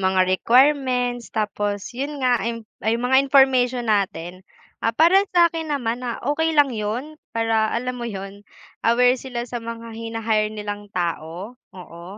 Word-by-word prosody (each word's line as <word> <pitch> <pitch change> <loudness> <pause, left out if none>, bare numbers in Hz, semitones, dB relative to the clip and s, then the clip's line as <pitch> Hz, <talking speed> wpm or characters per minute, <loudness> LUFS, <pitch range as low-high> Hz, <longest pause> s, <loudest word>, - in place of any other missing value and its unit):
mga 190 0 +2
requirements, 245 +4 +2
tapos 205 -1 -3
'yong 275 +1 -4
nga, 245 -2 +3
ah, - - -3
'yong 230 -1 -5 0.2
'yong 230 +2 0
mga 265 +1 +4
information 255 -3 +4
natin. 185 -3 -1 0.4
Ah, 230 - +2
para 340 - +5
sa 345 -1 +6
akin 325 -2 -5
naman 240 -3 -2
na 235 -2 -3
okey 320 +3 +1
lang 285 -3 +4
'yon 235 +9 -4 0.2
para, 225 -1 +1
alam 250 +1 -2
mo 240 - -5
'yon, 195 0 -7 0.4
aware 245 +2 +4
sila 245 -2 -5
sa 240 -1 -4
mga 230 0 -7
hina-hire 225 -2 -1
nilang 205 -1 -6
tao. 175 +4 -4 0.2
Oo, 170 -2 -11
230 Hz, 160 wpm, -22 LUFS, 210-255 Hz, 0.4 s, sa